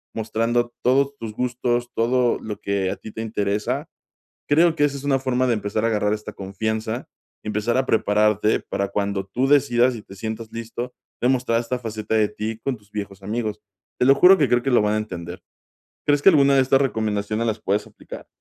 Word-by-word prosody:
mostrando 115 +2 0
todos 140 +2 +2
tus 110 -4 -6
gustos, 120 0 -1
todo 120 +1 +2
lo 105 -1 -6
que 100 -2 -1
a - - -3
ti 110 - -10
te 110 - -6
interesa, 105 -2 -2 0.6
creo 165 +3 +4
que 145 - +1
esa 140 -1 -2
es 135 - -9
una 140 -2 +2
forma 130 -1 0
de 120 - +3
empezar 105 0 -2
a - - +3
agarrar 105 -2 +1
esta 105 0 -6
confianza, 110 +4 -3 0.4
empezar 105 +3 -1
a 130 - +1
prepararte 105 0 +2
para 100 - -2
cuando 100 -1 -2
tú 120 +7 -1
decidas 130 -3 +3
y 110 - -7
te 95 - -13
sientas 110 +2 -6
listo, 115 +2 -6 0.3
demostrar 125 -2 +2
esta 125 +2 -3
faceta 110 -2 -3
de 110 -1 +3
ti 110 +1 -4
con 135 +1 -2
tus 105 -1 -26
viejos 100 -2 -6
amigos. 105 0 -3 0.4
Te - - +3
lo 135 +1 +6
juro 185 +6 +7
que 140 -5 +2
creo 120 0 +2
que 135 - 0
lo 120 - +5
van 105 0 +1
a - - +1
entender. 90 -5 -6 0.7
¿Crees 145 -1 +3
que - - +7
alguna 140 -4 +4
de 135 - +5
estas 135 +1 +3
recomendaciones 110 -3 -1
las 110 - -1
puedes 100 +2 -1
aplicar? - - -11
115 Hz, 200 wpm, -22 LUFS, 105-125 Hz, 0.7 s, juro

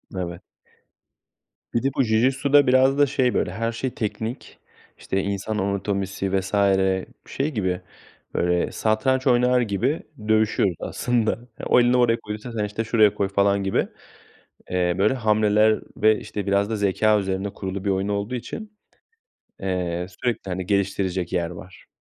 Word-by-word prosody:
Evet. 85 -1 -4 1.3
Bir 115 - 0
de 135 - +2
bu 135 - +4
Jiu 110 -1 +2
Jitsu'da 135 +2 +3
biraz 130 +2 +4
da 145 - +6
şey 130 -2 +1
böyle 90 - 0
her 115 +4 -2
şey 125 +3 -3
teknik. 110 +3 -5 0.4
İşte, 95 0 -2
insan 100 +2 -3
anatomisi 100 -1 -1
vs. 95 0 -7 0.7
şey 140 +3 -2
gibi, 95 -6 -1 0.5
böyle, 90 0 +1
satranç 130 +5 +1
oynar 125 0 +4
gibi 120 - -1 0.2
dövüşüyoruz 110 -4 +2
aslında. 120 -3 0 0.3
Ya, - - -6
o - - +5
elini 120 +1 +4
oraya 120 -1 +3
koyduysan 105 +2 -7
sen, 105 -2 -1
işte, 105 +2 -3
şuraya 110 -2 +4
koy 100 -1 0
falan 100 0 +2
gibi, 95 - 0 0.8
eee, 90 -1 +1
böyle 105 +6 +3
hamleler 110 -2 +3 0.2
ve, 110 0 +4
işte, 100 -1 -6
biraz 100 +1 +2
da 110 - -1
zekâ 105 +1 +2
üzerine 95 +1 -2
kurulu 95 0 -5
bir - - +1
oyun 95 +1 0
olduğu 105 +4 -2
için, 210 - -7 0.8
eee, 90 -2 -2
sürekli, 115 -3 -3
hani, 90 0 -3
geliştirecek 95 -3 -1
yer 85 -1 0
var. 90 +2 -12
105 Hz, 155 wpm, -23 LUFS, 95-120 Hz, 1.3 s, da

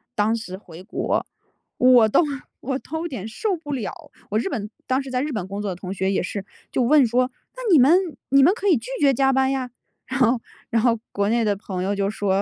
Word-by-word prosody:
当 215 0 +2
时 185 -5 -6
回 175 -4 -13
国， 220 - -1 0.5
我 250 -3 +6
都 - - +4 0.4
我 265 +1 -2
都 320 +3 -6
有 345 - -3
点 225 - -6
受 375 - -1
不 290 -3 -6
了， 235 -7 -3 0.4
我 210 - 0
日 230 - 0
本 210 -1 -4 0.2
当 260 +1 +1
时 270 - -8
在 250 0 -1
日 300 +1 -2
本 200 -6 -3
工 200 +1 -5
作 205 - -2
的 - - -4
同 180 +1 -7
学 190 0 0
也 - - +1
是， 195 +2 -4 0.3
就 250 - +1
问 275 0 +5
说， 250 +2 +1 0.3
“那 - - -6
你 320 - +7
们 260 +4 +6 0.4
你 275 0 +6
们 355 - +6
可 410 -1 -3
以 345 - +5
拒 230 +2 -8
绝 280 -2 +5
加 270 +1 +3
班 265 0 +2
呀， 255 -2 -2 0.3
“然 265 0 -3
后 245 0 +4 0.3
然 230 - +2
后 230 -3 +3
国 200 0 0
内 230 +2 +2
的 205 -2 +1
朋 190 -2 -5
友 200 +1 0
就 200 0 0
说， 200 -2 0
235 Hz, 260 characters per minute, -23 LUFS, 205-270 Hz, 0.5 s, 你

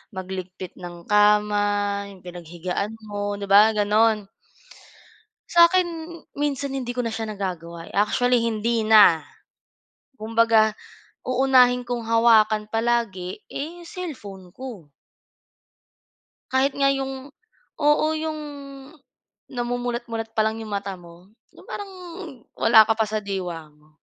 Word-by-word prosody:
magligpit 185 -1 -7
ng 175 -1 -9
kama, 205 -1 +2
yung 190 - -17
pinaghigaan 180 +3 -5
mo 205 -1 -4
'di 200 - -7
ba, 210 +3 +7
ganon. 210 0 +2 1.2
Sa'kin 340 -1 +3 0.2
minsan 280 -1 -2
hindi 245 -2 -4
ko 250 - -1
na 230 - -2
siya 225 0 -4
nagagawa, 175 -5 -6
actually 245 +5 +2
hindi 225 0 0
na 205 -8 +6 0.9
kumbaga 225 -1 +3 0.6
uunahin 250 -1 +4
kong 240 -2 -4
hawakan 220 -2 +4
palagi 225 -6 -1
eh, 340 +5 -6
cellphone 240 - -8
ko. 210 - -10 1.6
Kahit 265 +1 +2
nga 275 0 +2
'yong 270 0 -3 0.5
oo 295 0 +3
'yong 310 -1 -4 1.1
namumulat-mulat 240 -2 -3
pa 220 - +2
lang 220 +1 0
'yong 220 -2 -7
mata 200 -1 -4
mo 175 +1 -16 0.2
'yong - - -17
parang 405 -1 -6 0.7
wala 225 -1 +6
ka - - +5
pa 220 - +2
sa 215 0 -3
diwa 180 -6 -5
mo. 150 +1 -26
220 Hz, 115 wpm, -23 LUFS, 200-250 Hz, 1.6 s, ba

